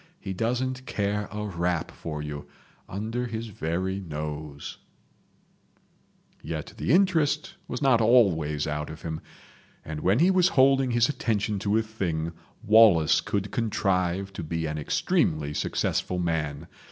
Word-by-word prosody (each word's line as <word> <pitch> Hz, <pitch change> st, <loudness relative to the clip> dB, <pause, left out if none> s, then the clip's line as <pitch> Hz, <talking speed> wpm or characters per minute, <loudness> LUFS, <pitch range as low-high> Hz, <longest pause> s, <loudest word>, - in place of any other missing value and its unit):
He 95 Hz, -, -5 dB
doesn't 125 Hz, +5 st, -2 dB
care 100 Hz, 0 st, -1 dB
a 105 Hz, 0 st, -4 dB
rap 90 Hz, -3 st, -1 dB
for 75 Hz, -2 st, -6 dB
you—under 105 Hz, +10 st, -6 dB
his 115 Hz, 0 st, -5 dB
very 95 Hz, 0 st, -2 dB
nose.... 75 Hz, -4 st, -6 dB, 0.8 s
." -, -, -37 dB
Yet -, -, -5 dB
the -, -, -1 dB
interest 170 Hz, -1 st, +2 dB
was -, -, -4 dB
not 130 Hz, -4 st, +4 dB
always 85 Hz, -, +3 dB
out 75 Hz, 0 st, -3 dB
of 80 Hz, 0 st, -9 dB
him, 80 Hz, -1 st, -4 dB, 0.6 s
and 75 Hz, -1 st, -5 dB
when 95 Hz, +7 st, +2 dB
he 175 Hz, +7 st, +5 dB
was 185 Hz, -1 st, +4 dB
holding 135 Hz, 0 st, +5 dB
his 120 Hz, -1 st, +3 dB
attention 105 Hz, -7 st, -1 dB
to 105 Hz, +2 st, +1 dB
a 115 Hz, -, +2 dB
thing 85 Hz, -7 st, -3 dB, 0.3 s
Wallace 105 Hz, -8 st, +6 dB
could 100 Hz, -1 st, -2 dB
contrive 95 Hz, -4 st, 0 dB
to -, -, -5 dB
be 80 Hz, +1 st, -2 dB
an 75 Hz, 0 st, -3 dB
extremely 75 Hz, 0 st, 0 dB
successful 90 Hz, -, -1 dB
man. 80 Hz, -3 st, -2 dB
100 Hz, 140 wpm, -27 LUFS, 80-115 Hz, 0.8 s, Wallace